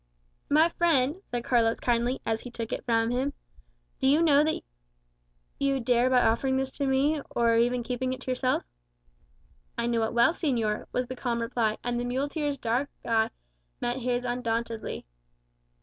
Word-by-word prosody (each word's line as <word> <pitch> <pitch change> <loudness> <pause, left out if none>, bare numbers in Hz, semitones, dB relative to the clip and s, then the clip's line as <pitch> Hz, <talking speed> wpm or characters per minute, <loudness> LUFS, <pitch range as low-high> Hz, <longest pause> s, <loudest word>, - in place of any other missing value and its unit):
"My 310 +3 +5
friend," 335 -1 +1
said 240 -1 -3
Carlos 230 -2 +2
kindly, 240 +2 0
as 225 0 -1
he 245 - -8
took 230 -2 -5
it - - -4
from 230 -1 +2
him, 265 +3 -1 0.7
"do 265 - +2
you 300 +5 +5
know 295 -2 +5
what 315 - -1 1.0
you 275 -1 +1
dare 245 +1 +2
by 255 -1 +4
offering 265 +4 +2
this 265 0 -1
to 280 0 -2
me, 280 +3 +2
or 235 -1 +3
even 240 +1 +2
by - - -15
keeping 255 +1 -1
it 255 - -6
yourself?" 255 0 0 1.1
"I - - 0
know 235 -1 +1
it 220 - -1
well, 235 +7 +4
señor," 235 -11 -1
was 250 - -1
the 255 - -6
calm 240 -2 -2
reply; 230 -2 0
and 240 0 -1
the 245 - -2
muleteer's 285 +3 -1
dark 245 +3 -1 0.2
eye 225 -1 +2 0.5
met 240 +1 -1
his 250 0 -1
undauntedly. 230 -2 -3
245 Hz, 170 wpm, -28 LUFS, 235-270 Hz, 1.1 s, My